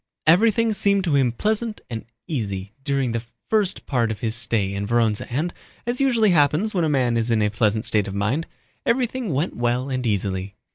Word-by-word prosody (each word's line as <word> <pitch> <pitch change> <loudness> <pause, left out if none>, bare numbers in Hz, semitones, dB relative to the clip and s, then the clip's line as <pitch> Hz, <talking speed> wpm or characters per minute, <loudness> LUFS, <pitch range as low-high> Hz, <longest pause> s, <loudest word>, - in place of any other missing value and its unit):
Everything 220 +6 +4
seemed 200 -1 +2
to 165 -6 +1
him 130 -3 +3
pleasant 215 - -1
and 115 -3 -6 0.2
easy 100 - -3
during 135 -3 0
that 115 0 -1 0.3
first 210 -4 +1
part 120 -5 +1
of 110 -2 -4
his 110 -2 -1
stay 110 -4 0
in 100 +1 -3
Vorónezh 115 -2 +1
and, 155 +8 -1 0.3
as 240 +2 -1
usually 235 -6 +4
happens 160 +6 +3
when 180 -3 +1
a 160 - +2
man 125 -5 +2
is 115 +1 0
in 115 -2 +3
a 105 - +1
pleasant 110 0 +1
state 105 -2 +1
of 100 - -5
mind, 115 +11 0 0.4
everything 245 -1 0
went 145 +5 -1
well 120 +3 0
and 130 -1 -1
easily. 100 -1 -2
130 Hz, 195 wpm, -23 LUFS, -, 0.4 s, Everything